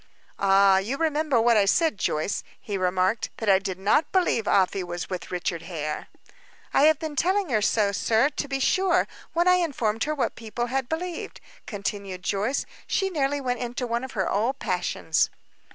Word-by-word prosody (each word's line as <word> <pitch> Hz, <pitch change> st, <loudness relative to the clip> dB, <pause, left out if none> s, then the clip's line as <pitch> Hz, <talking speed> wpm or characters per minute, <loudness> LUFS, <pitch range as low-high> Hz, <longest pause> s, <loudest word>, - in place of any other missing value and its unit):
"Ah! 195 Hz, 0 st, +5 dB
You 225 Hz, +8 st, -3 dB
remember 305 Hz, -4 st, +1 dB
what 230 Hz, 0 st, +4 dB
I 205 Hz, -, +4 dB
said, 310 Hz, -, +2 dB
Joyce," 155 Hz, +6 st, -1 dB, 0.2 s
he 205 Hz, -, -5 dB
remarked. 185 Hz, +3 st, 0 dB
"That 220 Hz, -, -1 dB
I 190 Hz, -1 st, +6 dB
did 190 Hz, -2 st, -4 dB
not 205 Hz, +11 st, +2 dB
believe 350 Hz, -, +1 dB
Afy 190 Hz, 0 st, +2 dB
was 175 Hz, 0 st, -6 dB
with 185 Hz, -, -5 dB
Richard 175 Hz, -2 st, -2 dB
Hare." 155 Hz, -3 st, -5 dB, 0.7 s
"I 285 Hz, -, +5 dB
have 315 Hz, -1 st, +5 dB
been 310 Hz, -1 st, -5 dB
telling 375 Hz, +4 st, +1 dB
her 220 Hz, -4 st, +2 dB
so, 205 Hz, -1 st, +2 dB
sir, 225 Hz, +6 st, +2 dB
to 290 Hz, -1 st, -4 dB
be 270 Hz, -1 st, -2 dB
sure, 370 Hz, +6 st, +2 dB, 0.3 s
when 345 Hz, +2 st, +2 dB
I 365 Hz, 0 st, +6 dB
informed 240 Hz, -10 st, 0 dB
her 305 Hz, +1 st, -1 dB
what 280 Hz, -, -1 dB
people 230 Hz, +1 st, -4 dB
had 265 Hz, -2 st, -1 dB
believed," 340 Hz, +1 st, -4 dB, 0.3 s
continued 200 Hz, -3 st, -5 dB
Joyce. 210 Hz, +9 st, -1 dB, 0.2 s
"She 385 Hz, 0 st, 0 dB
nearly 285 Hz, -3 st, 0 dB
went 250 Hz, -2 st, -2 dB
into 245 Hz, +1 st, -3 dB
one 235 Hz, +1 st, -2 dB
of 260 Hz, -, -7 dB
her 190 Hz, -4 st, -1 dB
old 230 Hz, +7 st, 0 dB
passions." 180 Hz, -, 0 dB
230 Hz, 185 wpm, -25 LUFS, 195-290 Hz, 0.7 s, I